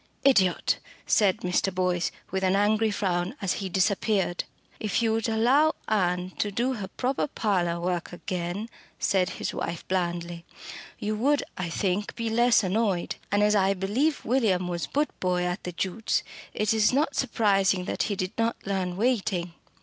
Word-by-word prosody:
"Idiot!" 195 Hz, -10 st, +3 dB, 0.3 s
said 200 Hz, -4 st, +3 dB
Mr. 180 Hz, +2 st, +1 dB
Boyce, 180 Hz, -1 st, 0 dB, 0.2 s
with 190 Hz, +1 st, -1 dB
an 190 Hz, 0 st, +3 dB
angry 215 Hz, +2 st, +3 dB
frown, 185 Hz, +1 st, -1 dB
as 190 Hz, -3 st, 0 dB
he 190 Hz, -, -3 dB
disappeared. 190 Hz, 0 st, +1 dB, 0.3 s
"If 215 Hz, +2 st, 0 dB
you 225 Hz, -1 st, +2 dB
would 225 Hz, 0 st, 0 dB
allow 255 Hz, +8 st, +3 dB
Ann 180 Hz, -3 st, 0 dB
to 205 Hz, -, +1 dB
do 240 Hz, +6 st, 0 dB
her 205 Hz, -6 st, -5 dB
proper 260 Hz, +8 st, -1 dB
parlour 180 Hz, -9 st, 0 dB
work 175 Hz, 0 st, -2 dB
again," 180 Hz, +3 st, -4 dB, 0.3 s
said 185 Hz, -2 st, +1 dB
his -, -, -3 dB
wife 170 Hz, -, -4 dB
blandly, 175 Hz, -2 st, -2 dB, 0.5 s
"you 215 Hz, +1 st, -2 dB
would, 285 Hz, +6 st, +2 dB
I 185 Hz, -2 st, -3 dB
think, 195 Hz, +3 st, -1 dB
be 230 Hz, -1 st, -2 dB
less 240 Hz, 0 st, +4 dB
annoyed. 195 Hz, -2 st, 0 dB
And 205 Hz, +1 st, +3 dB
as 210 Hz, 0 st, +4 dB
I 195 Hz, -1 st, +3 dB
believe 235 Hz, +12 st, 0 dB
William 215 Hz, -8 st, +2 dB
was 170 Hz, -2 st, -3 dB
boot 295 Hz, +2 st, 0 dB
boy 180 Hz, -1 st, +1 dB
at 180 Hz, 0 st, -3 dB
the 180 Hz, -, -3 dB
Jutes', 190 Hz, +5 st, -1 dB, 0.3 s
it 215 Hz, 0 st, +1 dB
is 215 Hz, -1 st, +4 dB
not 285 Hz, +2 st, +1 dB
surprising 195 Hz, -7 st, +2 dB
that -, -, -2 dB
he 205 Hz, -, 0 dB
did 185 Hz, 0 st, -3 dB
not 230 Hz, +1 st, +1 dB
learn 185 Hz, -3 st, -2 dB
waiting." 195 Hz, -7 st, 0 dB
195 Hz, 165 wpm, -27 LUFS, 180-225 Hz, 0.5 s, less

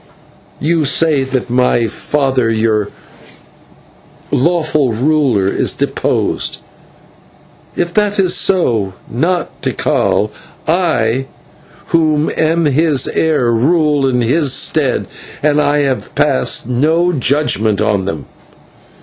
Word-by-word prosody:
You 160 Hz, +1 st, +1 dB
say 145 Hz, 0 st, +2 dB
that 130 Hz, -2 st, -3 dB
my 125 Hz, -1 st, +2 dB
father, 130 Hz, +1 st, -1 dB
your 110 Hz, -2 st, 0 dB, 1.4 s
lawful 155 Hz, -3 st, +1 dB
ruler, 125 Hz, -4 st, +1 dB
is -, -, 0 dB
deposed. -, -, -2 dB, 1.1 s
If 175 Hz, 0 st, -2 dB
that 210 Hz, 0 st, +1 dB
is 185 Hz, -2 st, +3 dB
so, 115 Hz, -, +1 dB
not 165 Hz, +7 st, -2 dB
Tikal, -, -, 0 dB, 0.3 s
but 160 Hz, -, +2 dB
I, 130 Hz, -7 st, 0 dB, 0.6 s
who 155 Hz, -2 st, +1 dB
am 165 Hz, +1 st, +1 dB
his 150 Hz, 0 st, +2 dB
heir, 150 Hz, -7 st, +1 dB
rule 145 Hz, +3 st, +2 dB
in 125 Hz, -1 st, 0 dB
his 135 Hz, +4 st, +1 dB
stead, -, -, 0 dB, 0.4 s
and 150 Hz, 0 st, +3 dB
I 145 Hz, 0 st, +1 dB
have 135 Hz, -2 st, -3 dB
passed 65 Hz, +11 st, +1 dB
no 160 Hz, +8 st, +1 dB
judgment 120 Hz, -, +1 dB
on 100 Hz, -3 st, 0 dB
them." 80 Hz, -7 st, -5 dB
140 Hz, 105 wpm, -14 LUFS, 120-160 Hz, 1.4 s, is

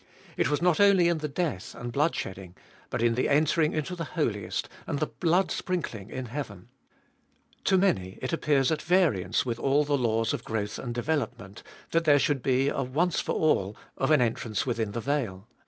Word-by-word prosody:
It -, -, +1 dB
was 145 Hz, +2 st, 0 dB
not 180 Hz, -3 st, +3 dB
only 195 Hz, -4 st, +5 dB
in 170 Hz, -2 st, 0 dB
the 150 Hz, -, -2 dB
death 145 Hz, -, -3 dB
and 120 Hz, 0 st, -6 dB
blood 150 Hz, +5 st, +2 dB
shedding, 95 Hz, -1 st, -6 dB, 0.3 s
but -, -, -2 dB
in 120 Hz, -1 st, +3 dB
the 125 Hz, -, 0 dB
entering 155 Hz, +2 st, +3 dB
into 155 Hz, +4 st, -2 dB
the 165 Hz, 0 st, -7 dB
Holiest 105 Hz, -, -1 dB, 0.2 s
and -, -, -1 dB
the 155 Hz, -, 0 dB
blood 175 Hz, +4 st, +1 dB
sprinkling 120 Hz, -, -3 dB
in 130 Hz, 0 st, -5 dB
heaven. 115 Hz, -7 st, -7 dB, 1.0 s
To 190 Hz, -, +4 dB
many 95 Hz, -, +1 dB
it 130 Hz, -, -4 dB
appears 145 Hz, -4 st, +2 dB
at 155 Hz, -1 st, 0 dB
variance 165 Hz, -, +2 dB
with 120 Hz, -2 st, -3 dB
all 140 Hz, +2 st, +3 dB
the 145 Hz, 0 st, +1 dB
laws 115 Hz, -2 st, +1 dB
of -, -, -4 dB
growth 105 Hz, -2 st, -3 dB
and 120 Hz, -, -4 dB
development, 120 Hz, -7 st, -3 dB, 0.3 s
that 165 Hz, 0 st, +1 dB
there 145 Hz, -2 st, +6 dB
should 145 Hz, -1 st, +1 dB
be 130 Hz, +2 st, +2 dB
a 140 Hz, -, 0 dB
once 155 Hz, +7 st, 0 dB
for -, -, -2 dB
all 105 Hz, -10 st, +1 dB, 0.2 s
of 135 Hz, -, 0 dB
an 155 Hz, -4 st, +5 dB
entrance 115 Hz, -2 st, -1 dB
within 115 Hz, -5 st, -2 dB
the 115 Hz, -, -3 dB
veil. 115 Hz, -8 st, -2 dB
135 Hz, 195 wpm, -27 LUFS, 115-160 Hz, 1.0 s, there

